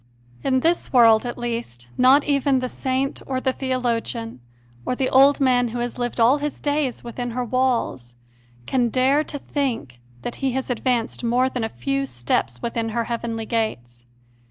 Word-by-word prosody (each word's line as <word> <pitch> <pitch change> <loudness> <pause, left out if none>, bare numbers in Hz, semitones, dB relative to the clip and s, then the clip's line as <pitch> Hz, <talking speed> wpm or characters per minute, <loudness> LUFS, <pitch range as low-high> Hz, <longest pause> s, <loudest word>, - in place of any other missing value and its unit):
In 260 -1 +2
this 335 +4 0
world, 230 -2 +5
at 240 - -5
least, 230 - -5
not 265 +3 +5
even 280 -1 +2
the 255 0 -1
saint 265 +1 -2
or 260 -1 -1
the 260 0 0
theologian, 235 - -2 0.4
or 250 - -1
the 260 0 -1
old 275 +2 +6
man 250 -3 +3
who 235 +1 -5
has 240 +1 -3
lived 245 0 -3
all 245 +6 +5
his 295 0 -4
days 290 -4 -1
within 245 +1 -5
her 250 - 0
walls, 235 - -1 0.5
can 245 - +1
dare 265 +5 +3
to 290 - -6
think 245 - -3 0.2
that 240 - -5
he 265 -2 0
has 265 0 -2
advanced 245 -1 -1
more 245 +2 +2
than 250 -3 -3
a 225 - -1
few 275 +3 -2
steps 120 - -2
within 230 -1 -2
her 230 +1 -1
heavenly 230 -1 -3
gates. 120 - -3
245 Hz, 175 wpm, -22 LUFS, 230-265 Hz, 0.5 s, old